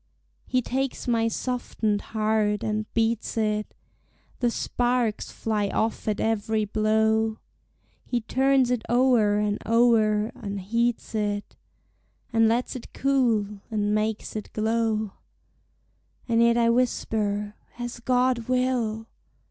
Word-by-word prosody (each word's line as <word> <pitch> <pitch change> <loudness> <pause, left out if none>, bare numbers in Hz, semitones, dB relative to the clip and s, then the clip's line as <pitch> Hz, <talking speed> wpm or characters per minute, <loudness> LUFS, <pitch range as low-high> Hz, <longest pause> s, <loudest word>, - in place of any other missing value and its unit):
He 255 -1 +1
takes 265 +2 -2
my 230 -2 +2
softened 225 -3 -1
heart 215 -1 0
and 215 0 -2
beats 230 0 0
it, 215 -1 0 0.7
The 245 - +2
sparks 240 -2 -1
fly 210 -2 -1
off 220 +2 -1
at 215 - 0
every 220 -1 0
blow; 220 +1 +1 0.7
He 240 -1 -2
turns 265 +2 +2
it 245 -2 +1
o'er 240 -4 +4
and 210 0 0
o'er, 225 -2 +3
and 200 0 -5
heats 230 +6 -1
it, 205 -1 -2 0.8
And 225 0 +5
lets 240 +3 0
it 250 - -8
cool, 230 -7 +1
and 210 -2 0
makes 215 +1 -1
it 215 - -5
glow: 220 -1 0 1.2
And 230 -1 +3
yet 235 0 +4
I 230 -1 +4
whisper, 210 -4 0 0.2
As 240 0 -5
God 250 -1 +1
will! 250 -4 0
225 Hz, 120 wpm, -25 LUFS, 215-240 Hz, 1.2 s, And